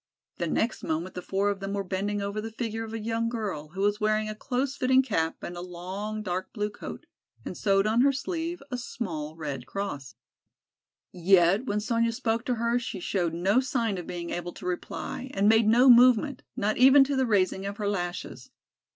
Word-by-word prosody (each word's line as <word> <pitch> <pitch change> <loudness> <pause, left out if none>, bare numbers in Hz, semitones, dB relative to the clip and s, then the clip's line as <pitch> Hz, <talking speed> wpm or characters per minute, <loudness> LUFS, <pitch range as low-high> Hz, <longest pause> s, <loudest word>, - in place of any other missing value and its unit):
The - - -1
next 225 0 0
moment 165 +4 -2
the 180 - -5
four 195 +3 0
of 200 - -5
them 195 0 -4
were 200 -1 -1
bending 200 +2 -2
over 200 +1 -3
the 225 - -5
figure 225 0 -4
of 225 - -7
a 225 - -3
young 230 +1 -1
girl, 205 -10 -4
who 195 - -3
was 205 +1 +2
wearing 215 0 +1
a - - -3
close 260 +5 -2
fitting 260 -1 +4
cap 165 -10 -1
and 175 - -5
a 175 - -6
long 190 +5 -5
dark 185 -1 -3
blue 210 -1 -2
coat, - - -8 0.4
and - - -5
sewed 195 -1 +2
on 220 +3 +3
her 275 +2 +5
sleeve 330 +4 -4
a 250 - -2
small 160 - -5
Red 140 -6 -5
Cross. 140 - -5 1.0
Yet 185 +4 +4
when 205 +1 0
Sonya 230 +2 +1
spoke 225 +1 -1
to 250 - 0
her, 235 +1 +1
she 235 - -5
showed 175 -2 -1
no 195 +7 +3
sign 235 -7 -1
of 175 - -8
being 170 -1 -5
able 175 0 -4
to - - -11
reply 180 +7 -4
and 200 +1 +3
made 220 0 +5
no 240 +4 +5
movement, 250 +2 +6
not 215 -3 0
even 270 +2 +8
to 275 +1 -1
the 265 -1 +1
raising 195 -2 +1
of 200 +1 -5
her 210 - -2
lashes. 175 -3 -4
210 Hz, 205 wpm, -27 LUFS, 185-235 Hz, 1.0 s, even